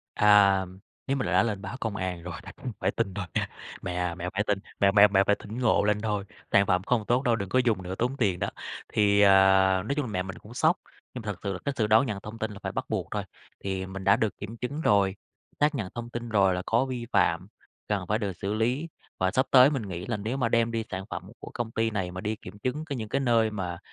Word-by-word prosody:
"À, 100 -2 +5 0.4
nếu 135 +1 0
mà 130 - -1
đã - - +4
lên 105 -4 -2
báo 95 +6 -6
công 110 -3 -2
an 90 -2 -3
rồi 90 0 -6
đành - - -11 0.3
phải 95 +1 +2
tin 100 -4 -2
thôi 100 -3 -4
mẹ - - +1 0.4
mẹ 90 - -3
à, 90 -1 -1
mẹ 90 0 -4
phải 105 - +1
tin, 100 -1 +1 0.2
mẹ 100 -1 +5
mẹ 105 0 +8
mẹ 100 0 +3
phải 105 - +3
tỉnh 110 +4 -8
ngộ 115 -4 +3
lên 105 0 +2
thôi, 105 -2 -1 0.3
sản 100 0 +5
phẩm 90 0 +2
không 110 +1 0
tốt 125 +2 +2
đâu, 120 -4 +2
đừng 100 -3 -4
có 130 - +2
dùng 110 -6 +1
nữa 90 +1 -5
tốn 125 +3 0
tiền 100 -8 +1
đó." - - -1 0.4
Thì, 100 -1 +4
ờ, 100 -1 +7 0.6
nói 140 - 0
chung 145 - 0
là 115 - -5
mẹ 90 -2 -1
mình 95 0 -8
cũng 115 +3 -13
sốc 160 +6 +3 0.4
nhưng 125 - -5
mà - - -13
thật 105 -3 -2
sự 100 -1 -2
là 95 - -4
cái 140 - -1
sự 110 - +2
đón 110 +5 +5
nhận 105 -3 -3
thông 110 +2 -8
tin 110 0 -2
là 100 - -9
phải - - -3
bắt - - -2
buộc - - -2
thôi. - - -2 0.4
Thì 95 -1 -3
mình 95 0 -7
đã 100 - +5
được 110 -2 -1
kiểm 115 +3 -7
chứng 140 +6 -4
rồi, 100 -6 +3 0.4
xác 150 +1 +3
nhận 105 -8 -3
thông 120 0 -6
tin 120 0 -5
rồi 100 -4 +3
là 90 - -2
có 120 +4 +2
vi 125 -2 -4
phạm - - +2 0.4
cần 100 -4 -1
phải 105 +1 +1
được 100 -3 -2
xử 100 +4 -3
lý. 125 +9 0 0.3
Và 95 0 +2
sắp 130 +5 +1
tới 130 +1 +8
mình 135 -5 -2
nghĩ 90 -3 -6
là 115 - -1
nếu 110 +6 -3
mà 120 -4 +1
đem 115 0 +2
đi 115 -1 -2
sản 95 0 -4
phẩm - - -4 0.2
của - - -9
công 120 -2 -3
ty 115 0 0
này 95 -4 -2
mà 90 - -6
đi 105 +2 -2
kiểm 105 - -11
chứng 130 +7 -3
những 110 -2 -5
cái 140 - 0
nơi 115 -4 +3
mà, 90 -5 -4
105 Hz, 275 wpm, -27 LUFS, 95-120 Hz, 0.6 s, mẹ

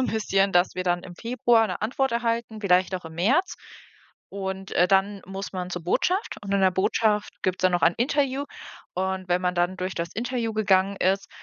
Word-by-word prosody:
so - - +2
'n - - +1
bisschen, 200 -3 +1
dass 175 0 +3
wir 185 - -2
dann 175 0 0
im 175 - -10
Februar 230 0 +2
'ne 185 +1 -5
Antwort 265 +3 0
erhalten, 230 -2 -1
vielleicht 185 0 +3
auch 180 - -5
im 160 0 -9
März. 265 - +1 0.7
Und, 190 -1 -5
äh, 180 +1 +3
dann 195 0 +2
muss 195 +1 -6
man 180 -1 -4
zur 180 - -4
Botschaft 370 - 0
und 200 0 -4
in 200 - +2
der 190 -1 +5
Botschaft 210 +2 +1
gibt's 185 0 -1
dann 185 -1 +4
noch 175 - +1
ein 170 +1 +4
Interview 275 +2 0 0.5
und 190 0 -2
wenn 180 +1 +2
man 180 0 0
dann 175 +1 0
durch 185 +1 -4
das 170 0 -3
Interview 235 -1 -2
gegangen 195 -2 +2
ist, 195 +1 0
195 Hz, 210 wpm, -25 LUFS, 185-225 Hz, 0.7 s, der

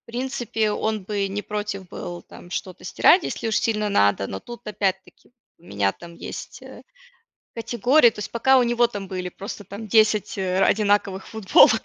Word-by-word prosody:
в - - -75
принципе, 235 -3 -2
он 215 -2 -2
бы 200 0 -2
не 205 +1 -4
против 205 -3 -5
был 175 0 -7
там 175 - -14
что-то 185 0 -5
стирать, 340 - +4
если 230 - -4
уж 220 - 0
сильно 215 -2 0
надо. 100 - +2
Но 95 - -6
тут, 240 0 -11
опять-таки, 195 -1 -3 0.3
у - - -28
меня 100 - -1
там 170 -1 -13
есть, - - -8
э, - - -12 0.7
категории 240 +3 +3
то - - -17
есть 210 - -6
пока 265 +3 +4
у 250 - +3
него 240 0 +2
там 205 -4 -6
были, 180 -1 -4
просто 200 +3 -8
там 205 +3 -8
10 215 -1 +3
ра 185 0 +2
одинаковых 200 -2 +1
футболок 220 +1 +5
210 Hz, 180 wpm, -23 LUFS, 190-225 Hz, 0.7 s, футболок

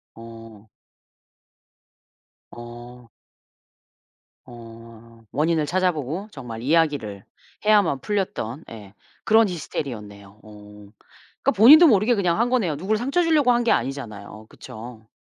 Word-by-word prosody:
어. 115 -2 -13 1.8
어. 120 0 -12 1.4
어. 115 -1 -15
원인을 155 +1 0
찾아 185 +3 +1
보고 160 +6 -6
정말 115 -4 -9
이야기를 140 -9 0 0.4
해야만 205 -10 +3
풀렸던 170 - -4
예 105 -3 -12 0.3
그런 220 -1 +4
히스테리였네요. 105 - -7
어. 105 -1 -15 0.6
그러니까 275 - +3
본인도 305 - +8
모르게 220 0 +3
그냥 180 -2 0
한 240 +1 +1
거네요. 210 -12 0
누구를 195 +8 -2
상처 275 +9 0
주려고 300 -6 +3
한 240 0 +1
게 235 - +1
아니잖아요. 110 -5 -4
그쵸? 110 0 -12
135 Hz, 260 characters per minute, -22 LUFS, -, 1.8 s, 본인도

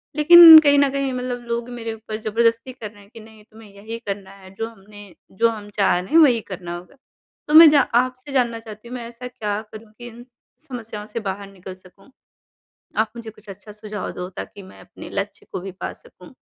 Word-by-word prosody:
लेकिन 325 +1 +10
कहीं 285 -2 +3
न 280 -1 +3
कहीं 275 -1 -2
मतलब 250 -1 -4
लोग 235 +1 -4
मेरे 230 -2 -6
ऊपर 220 -1 -8
ज़बरदस्ती 230 +3 0
कर 225 -4 -9
रहे 205 -2 -19
हैं 200 - -20
कि 230 - -12
नहीं 220 -1 -17
तुम्हें 220 -1 -16
यही 215 +3 -8
करना 195 -1 -6
है, 190 -1 -16
जो 225 +3 -4
हमने 205 -2 -16 0.2
जो 230 +4 +1
हम 210 -2 -8
चाह 195 -3 +2
रहे 180 - -9
हैं 325 - +4
वही 260 -7 +5
करना 175 -2 -6
होगा। 180 +10 -15 0.5
तो 300 - -3
मैं 320 0 +10
जा 290 -2 +4 0.2
आपसे 255 +2 -9
जानना 240 -4 0
चाहती 220 0 -13
हूँ 250 - -8
मैं 235 -2 -7
ऐसा 240 +1 -10
क्या 210 -4 -4
करूँ 215 0 -13
कि 240 - -10
इन 240 +1 -13 0.4
समस्याओं 225 -5 -8
से 230 - -5
बाहर 200 -1 -6
निकल 190 -1 -11
सकूँ? 185 +6 -21 0.9
आप 220 0 0
मुझे 230 -1 -8
कुछ 210 -1 -22
अच्छा 205 +2 -12
सुझाव 210 -1 -7
दो 180 0 -7
ताकि 200 - -9
मैं 190 - -16
अपने - - -13
लक्ष्य 200 +1 -6
को - - -4
भी 190 +1 -8
पा - - -4
सकूँ। - - -18
225 Hz, 220 wpm, -21 LUFS, 205-245 Hz, 0.9 s, लेकिन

